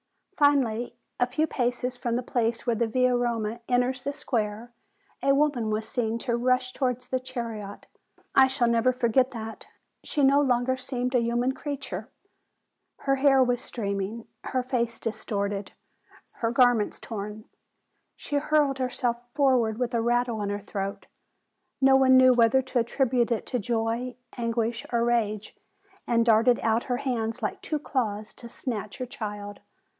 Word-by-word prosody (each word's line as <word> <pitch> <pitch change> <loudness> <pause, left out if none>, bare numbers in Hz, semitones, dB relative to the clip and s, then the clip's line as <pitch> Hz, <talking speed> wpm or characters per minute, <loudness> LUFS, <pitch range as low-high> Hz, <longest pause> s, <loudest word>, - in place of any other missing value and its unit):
Finally, 245 -6 +2 0.2
a 245 - +3
few 305 +5 +1
paces 245 -3 -1
from 240 -2 -2
the 250 - -1
place 235 -2 -1
where 240 -2 +1
the 230 +1 +1
Via 255 +2 +2
Roma 235 -2 -1
enters 250 +1 +1
the 280 +2 -2
square, 235 -5 -3 0.5
a 275 +1 +3
woman 275 -6 +1
was 215 +1 -2
seen 230 -2 -1
to 235 0 -1
rush 255 +1 +1
towards 250 -2 -2
the 260 - 0
chariot. 230 -6 -6 0.3
Ah, - - -28
I 265 -1 +7
shall 260 -2 +1
never 235 +2 +3
forget 255 +1 +2
that! 225 -2 -7 0.4
She 290 - -1
no 275 +1 +5
longer 255 -1 +2
seemed 255 0 -3
a 250 - +4
human 240 +2 +1
creature: 285 0 -5 0.9
her 275 0 +1
hair 270 -1 +5
was 245 -1 0
streaming, 200 0 -4 0.2
her 255 -1 -1
face 235 -2 -1
dis 225 - -4
torted, 200 -1 -2 0.7
her 230 - 0
garments 240 -3 +3
torn. 210 0 -6 0.7
She 290 - -3
hurled 285 -2 +2
herself 250 -2 -1 0.2
for 275 -3 +4
ward 220 -2 -1
with 250 0 -2
a 230 - +2
rattle 240 -1 +1
in 200 - -2
her 205 0 -2
throat, 195 -1 -5 0.7
no 270 0 +6
one 260 -1 +6
knew 255 0 +7
whether 240 +2 +4
to 255 -1 -1
attribute 240 0 +1
it 230 - 0
to 250 - -2
joy, 230 +3 -1 0.2
anguish, 230 0 -1
or 235 -1 +2
rage, 215 -3 0 0.5
and 230 -1 +3
darted 230 +1 +4
out 225 +1 +1
her 245 -2 -1
hands 240 -3 -2
like 210 - -2
two 310 - -2
claws 220 -7 -2
to 235 - -11
snatch 215 -4 -5
her 255 - -3
child. 205 -4 -6
240 Hz, 165 wpm, -27 LUFS, 225-255 Hz, 0.9 s, I